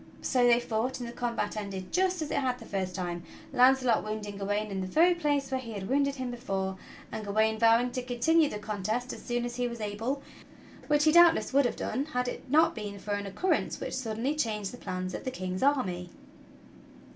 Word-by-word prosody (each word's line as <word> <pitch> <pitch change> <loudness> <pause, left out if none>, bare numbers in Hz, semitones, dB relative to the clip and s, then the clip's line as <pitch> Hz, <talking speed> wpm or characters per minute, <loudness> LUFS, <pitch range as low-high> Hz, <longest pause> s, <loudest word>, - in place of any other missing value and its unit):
So 250 -2 +3
they 240 0 +6
fought, 240 +2 -2
and 240 - -5
the 235 - -7
combat 240 -3 -2
ended 195 -3 -5
just 370 -2 +1
as 300 - -6
it - - 0
had 255 -2 0
the - - -11
first 185 -2 -3
time 175 -1 -3 0.2
— - - -20
Launcelot 255 -2 +4
wounding 215 -1 -5
Gawain 205 +1 -2
in 190 -1 -2
the 185 - -3
very 335 - +5
place 290 -5 0
where 260 - 0
he 230 -3 -7
had 195 -2 -5
wounded 280 +1 +2
him 255 -2 -4
before, 195 -6 -3 0.4
and 215 - -4
Gawain 220 +2 +1
vowing 230 +2 +4
to 255 - -3
continue 270 +6 +2
the 210 - -4
contest 215 +4 -3
as - - -9
soon 240 -1 -1
as 240 0 -5
he 245 0 0
was 235 -1 -6
able, 225 +7 -3 0.6
which 295 0 +3
he 310 - +5
doubtless 330 -9 +6
would 280 0 +5
have 245 - 0
done 275 - -2
had 250 -5 -2
it 245 - -6
not 320 +4 +5
been 205 -2 -6
for 200 +1 -6
an 205 0 -2
occurrence 285 - 0
which - - -4
suddenly 245 +2 -1
changed 215 -9 -2
the 245 - -9
plans 185 -3 -4
of - - -5
the - - -2
King's 185 -6 -4
army. 190 -11 +1
240 Hz, 220 wpm, -29 LUFS, 205-265 Hz, 0.6 s, they